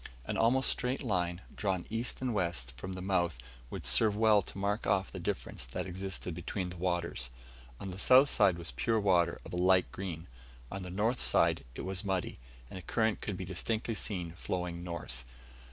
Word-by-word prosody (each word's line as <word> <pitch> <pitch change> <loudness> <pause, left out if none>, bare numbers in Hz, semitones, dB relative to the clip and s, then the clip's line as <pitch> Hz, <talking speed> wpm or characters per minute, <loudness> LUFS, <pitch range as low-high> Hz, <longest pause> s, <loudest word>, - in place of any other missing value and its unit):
An - - -2
almost 125 +4 +4
straight 125 +3 -1
line, 90 -6 0
drawn 95 -4 -1
east 115 +3 -2
and 125 -2 0
west 85 - -1
from 95 +9 -6
the 95 0 -6
mouth 90 -6 +1 0.3
would - - -6
serve 110 -2 +4
well 110 -1 +5
to 95 - -9
mark 100 +2 -1
off 95 -1 +2
the - - -6
difference - - -3
that - - -3
existed 95 -1 -4
between 90 +2 -3
the - - -7
waters. 85 -8 -1 0.5
On 95 - -5
the 90 - -7
south 130 +6 +7
side 100 -9 +4
was 85 -5 -3
pure 65 - +1
water 90 -4 +3
of - - -9
a - - -1
light 90 0 +4
green, 85 -4 -5 0.5
on 100 +1 -4
the 90 - -6
north 110 +7 0
side 85 -3 +4
it - - -5
was 95 +1 -3
muddy, 95 -8 -2 0.3
and 80 - -8
the - - -6
current 110 +4 0
could 100 -3 -3
be 95 - -4
distinctly 110 +6 -1
seen 90 -5 -3
flowing 90 0 -3
north. 85 -8 -6
95 Hz, 195 wpm, -32 LUFS, 85-105 Hz, 0.5 s, south